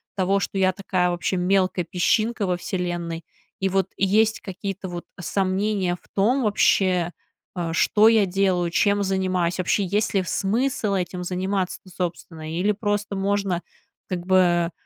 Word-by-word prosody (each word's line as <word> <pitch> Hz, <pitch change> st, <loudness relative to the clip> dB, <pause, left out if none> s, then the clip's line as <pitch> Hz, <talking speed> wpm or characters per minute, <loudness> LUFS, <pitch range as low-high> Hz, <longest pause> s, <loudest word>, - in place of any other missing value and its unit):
того, 195 Hz, +1 st, +2 dB
что 195 Hz, -, -3 dB
я 190 Hz, 0 st, +3 dB
такая 180 Hz, -2 st, 0 dB
вообще 175 Hz, +2 st, -1 dB
мелкая 185 Hz, -1 st, +1 dB
песчинка 215 Hz, +5 st, +1 dB
во 180 Hz, -1 st, 0 dB
Вселенной. 175 Hz, -3 st, -3 dB, 0.4 s
И 190 Hz, 0 st, +1 dB
вот 195 Hz, 0 st, +1 dB
есть 215 Hz, +3 st, +3 dB
какие-то, 195 Hz, 0 st, -5 dB
вот, 175 Hz, -1 st, -6 dB, 0.2 s
сомнения 190 Hz, +1 st, 0 dB
в -, -, -26 dB
том 240 Hz, +7 st, +3 dB
вообще, 185 Hz, -4 st, +2 dB, 0.4 s
а, 170 Hz, -2 st, -2 dB
что 210 Hz, +5 st, +4 dB
я 220 Hz, -2 st, +5 dB
делаю, 185 Hz, -2 st, +1 dB
чем 205 Hz, +3 st, +2 dB
занимаюсь, 185 Hz, -2 st, 0 dB
вообще 190 Hz, +3 st, +1 dB
есть 205 Hz, +4 st, 0 dB
ли 195 Hz, -, +4 dB
в -, -, -6 dB
смысл 220 Hz, +1 st, 0 dB
этим 180 Hz, -1 st, -3 dB
заниматься-то, 185 Hz, +1 st, -2 dB
собственно, 165 Hz, -3 st, -5 dB
или 180 Hz, +5 st, +1 dB
просто 205 Hz, -1 st, -2 dB
можно 195 Hz, -2 st, 0 dB, 0.5 s
как 180 Hz, -2 st, -3 dB
бы, 175 Hz, -2 st, +3 dB
190 Hz, 150 wpm, -23 LUFS, 180-200 Hz, 0.5 s, я